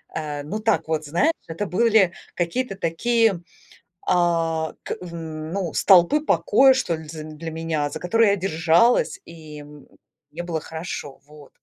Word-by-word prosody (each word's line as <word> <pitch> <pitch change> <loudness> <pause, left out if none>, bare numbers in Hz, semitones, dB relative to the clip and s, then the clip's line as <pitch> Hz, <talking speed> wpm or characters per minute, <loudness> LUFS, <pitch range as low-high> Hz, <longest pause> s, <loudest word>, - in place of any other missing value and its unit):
э, 150 -2 -4
ну, 210 +9 -4
так 220 -6 0
вот, 155 -1 -2
знаешь, 225 - +1
это 165 +6 -4
были 210 -2 +3 0.2
какие-то 195 +6 -2
такие, 210 +2 +1 0.7
а, 165 -2 +1
к - - -4
ну, 165 +1 -5
столпы 190 - +5
покоя, 285 - +4
что 255 -10 -1
ли, 160 -1 -10
з 155 -1 -7
для 155 +1 -8
меня, 160 -2 -2
за - - -7
которые 225 +4 +3
я - - +2
держалась, 175 +5 +2
и, 155 -2 -11
м, 145 0 -14 0.4
мне 170 +3 -6
было 165 -2 -3
хорошо. 160 -4 -7
Вот. 150 -2 -15
170 Hz, 150 wpm, -23 LUFS, 155-200 Hz, 0.7 s, столпы